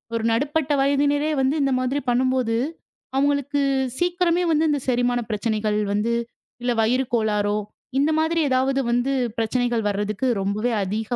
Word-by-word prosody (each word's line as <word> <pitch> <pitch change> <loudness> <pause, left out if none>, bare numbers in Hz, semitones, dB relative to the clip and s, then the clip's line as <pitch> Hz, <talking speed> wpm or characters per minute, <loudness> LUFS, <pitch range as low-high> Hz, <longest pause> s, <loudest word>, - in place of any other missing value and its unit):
ஒரு 225 - -1
நடுப்பட்ட 290 +5 0
வயதினரே 285 +2 +2
வந்து 265 +3 +1
இந்த 275 - +1
மாதிரி 255 +3 0
பண்ணும்போது 250 -2 +1 0.6
அவுங்களுக்கு 285 +1 +1 0.4
சீக்கிரமே 355 0 +1 0.3
இந்தச் 290 -3 -1
செரிமான 245 0 +1
பிரச்சனைகள் 215 -1 -1 0.2
வந்து 215 +3 0 0.5
இல்ல 245 - +1
வயிறு 250 +4 +2
கோளாறோ 210 -2 +1 0.4
இந்த 290 +3 +2
மாதிரி 325 +1 +1
ஏதாவது 265 +1 +1
வந்து 245 +3 +1 0.3
பிரச்சனைகள் 235 0 0
வர்றதுக்கு 205 +4 -2
ரொம்பவே 210 +5 -1
அதீக 215 +5 -2
250 Hz, 130 wpm, -23 LUFS, 220-285 Hz, 0.6 s, வயதினரே